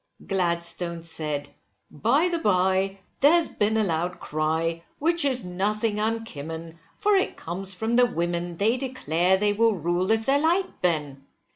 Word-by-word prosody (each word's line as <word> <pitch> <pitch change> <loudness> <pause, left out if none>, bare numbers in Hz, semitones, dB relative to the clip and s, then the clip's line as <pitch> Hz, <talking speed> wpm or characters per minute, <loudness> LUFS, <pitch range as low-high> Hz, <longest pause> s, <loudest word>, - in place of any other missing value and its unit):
Gladstone 170 -2 -1
said 150 -3 -3 0.4
by 265 - +2
the 345 -2 -1
bye, 190 - +1 0.2
there 290 +4 +6
has 340 -2 +3
been 215 +1 0
a 220 - +3
loud 175 -1 -2
cry, 160 +2 -1
which 335 +2 +3
is 260 -5 +1
nothing 210 +4 -1
unkimmon, 165 -7 -4 0.2
for 420 0 +1
it 380 - 0
comes 190 +3 -4
from 225 +4 0
the 250 0 +6
women, 175 -2 -2
they 220 +6 +2
declare 190 - +1
they 205 +1 +2
will 225 +1 +3
rule 175 +2 -1
if 220 0 +2
they 280 +1 +3
like, 355 +4 0
Ben. 150 -6 -1
190 Hz, 155 wpm, -25 LUFS, 170-230 Hz, 0.4 s, there